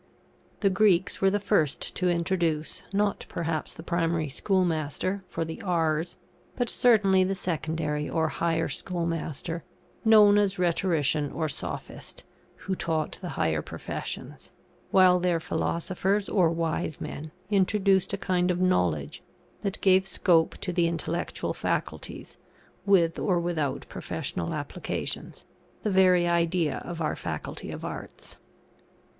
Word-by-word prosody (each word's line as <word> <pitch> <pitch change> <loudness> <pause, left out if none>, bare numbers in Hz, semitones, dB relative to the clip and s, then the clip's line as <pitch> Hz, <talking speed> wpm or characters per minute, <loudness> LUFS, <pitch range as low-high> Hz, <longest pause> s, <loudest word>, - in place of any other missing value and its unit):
The 195 -2 +3
Greeks 190 -2 +3
were 195 - +5
the 205 +1 +1
first 195 -8 0
to 180 -1 +1
introduce, 170 -3 0
not 200 0 0
perhaps 165 -2 -2
the 160 - -9
primary 165 -3 0
schoolmaster, 180 +2 0
for 165 - -3
the 160 0 -7
R's, 165 -2 0 0.4
but 245 -2 -1
certainly 200 -6 +4
the 195 +1 0
secondary 155 -4 -2
or 160 -1 +1
higher 165 0 0
schoolmaster, 165 -2 -3 0.4
known 210 -2 +7
as 200 -1 +1
Rhetorician 165 -5 +1
or 160 - -1
Sophist, 150 - -6 0.4
who 195 - -1
taught 160 -4 -2
the 180 - -5
higher 80 -1 +1
professions; - - -6 0.4
while 185 -1 +6
their 175 -2 +1
Philosophers 185 +5 -1
or 180 -5 +3
wise 165 -2 -2
men, 155 +1 -6 0.2
introduced 195 -1 +3
a 200 - -1
kind 185 -2 +1
of 180 -1 0
knowledge 90 - +1 0.4
that 200 0 -2
gave 190 0 +4
scope 170 -3 +2
to 180 - -3
the 170 -1 +3
intellectual 165 0 -2
faculties, - - -4 0.5
with 170 -4 +4
or 180 -4 +2
without 160 -6 -2
professional 85 -1 -4
applications; - - -5 0.4
the 210 - 0
very 185 -2 +5
idea 170 -3 +1
of 170 -1 -5
our 155 - 0
Faculty - - -5
of - - -6
Arts. - - -8
175 Hz, 130 wpm, -27 LUFS, 160-190 Hz, 0.5 s, known